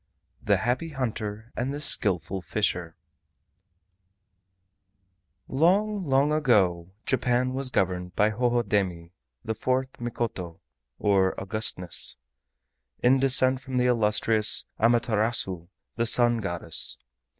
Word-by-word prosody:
THE 100 -1 +2
HAPPY 125 - -2
HUNTER 110 -3 -5
AND 125 +3 -3
THE 145 - -5
SKILLFUL 95 - 0
FISHER 85 +1 -2 2.5
Long, 195 +8 +1
long 140 -1 +1
ago 95 - +1 0.2
Japan 125 0 0
was 135 0 0
governed 90 -5 -2
by 105 +1 +2
Hohodemi, 105 -7 -1 0.3
the 110 - -2
fourth 130 +3 -3
Mikoto 115 -8 -5 0.4
(or 95 -2 +1
Augustness) 95 -3 0 0.9
in 130 +2 +4
descent 130 -1 +2
from 130 -2 -5
the 125 - +2
illustrious 110 -2 +4 0.2
Amaterasu, 110 -6 0 0.3
the 115 0 0
Sun 120 0 +2
Goddess. 85 -5 0
115 Hz, 100 wpm, -25 LUFS, 95-130 Hz, 2.5 s, in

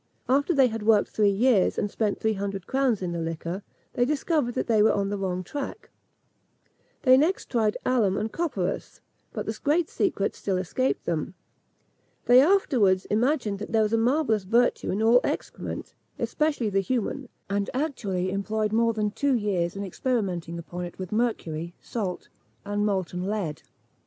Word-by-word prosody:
After 280 +6 +2
they 275 -5 +5
had 225 -2 -2
worked 210 -1 +3
three 210 -2 +2
years, 205 0 +3
and 205 - -1
spent 210 -3 -1
three 220 0 +1
hundred 195 -2 -4
crowns 260 -7 +1
in 175 - -2
the 170 - -3
liquor, 165 +3 -4 0.3
they 245 - +2
discovered 285 -2 0
that - - 0
they 220 -3 +3
were 220 - +5
on 200 -1 0
the 205 - -2
wrong 185 -1 -2
track. 280 +8 -6 1.1
They 255 -1 +7
next 320 +7 +1
tried 220 -4 +1
alum 220 -7 +2
and 215 +1 -2
copperas; 250 - -3 0.3
but - - -4
the - - -3
great 315 +3 +2
secret 205 - 0
still 195 -2 -2
escaped 190 +9 -1
them. 170 +2 -2 0.9
They 245 +1 +7
afterwards 250 - +3
imagined 220 -2 +1
that 210 - -7
there 220 -1 +4
was 215 +1 -1
a - - +4
marvellous 235 -3 +2
virtue 235 +5 +2
in 205 +3 0
all 235 +2 +6
excrement, - - -4 0.2
especially 295 -8 0
the 195 - +2
human, 250 +4 -2 0.2
and 200 0 -1
actually 205 - -2
employed 215 +2 -1
more 230 +1 +3
than 210 -1 -1
two 280 +4 +1
years 190 -6 0
in 200 - -4
experimentalising 185 -5 -2
upon 175 +1 -6
it 175 - -9
with 185 -2 -6
mercury, 175 -8 -2
salt, 195 -6 -4 0.4
and 205 +1 0
molten 185 -2 -2
lead! 195 -8 -3
215 Hz, 170 wpm, -26 LUFS, 190-250 Hz, 1.1 s, They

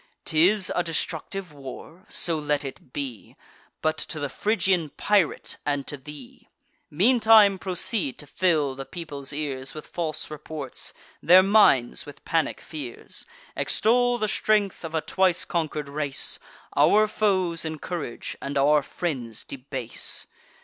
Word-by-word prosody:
'Tis 180 +5 +3
a - - +3
destructive 170 +1 -3
war? 150 +7 -10
So 165 -2 -1
let 150 -1 0
it 130 -1 -8
be, 130 -6 -5 0.5
But 155 0 +1
to 155 - -3
the 145 -1 -2
Phrygian 185 - +1
pirate, 200 +2 +1
and 145 -2 -1
to 145 - -3
thee! 140 -2 -12 0.4
Meantime 215 - +5
proceed 180 - 0
to 145 - -7
fill 150 -2 +1
the 135 +1 -5
people's 145 -6 -5
ears 140 -2 -3
With 155 - -7
false 155 -3 -3
reports, 150 -3 -5 0.3
their 180 +3 +7
minds 190 - +4
with 145 - -12
panic 165 -1 0
fears: 140 -7 -7 0.3
Extol 245 +2 +2
the 215 -2 0
strength 205 -2 +1
of 165 0 -5
a 160 - +1
twice 185 0 +1
conquer'd 155 -3 -2
race; 140 -1 -2 0.4
Our 205 +9 +5
foes 185 -6 +1
encourage, 160 -3 -5
and 140 +1 -3
our 145 +2 +5
friends 125 -9 -4
debase. 130 -3 -4
155 Hz, 135 wpm, -25 LUFS, 140-185 Hz, 0.5 s, their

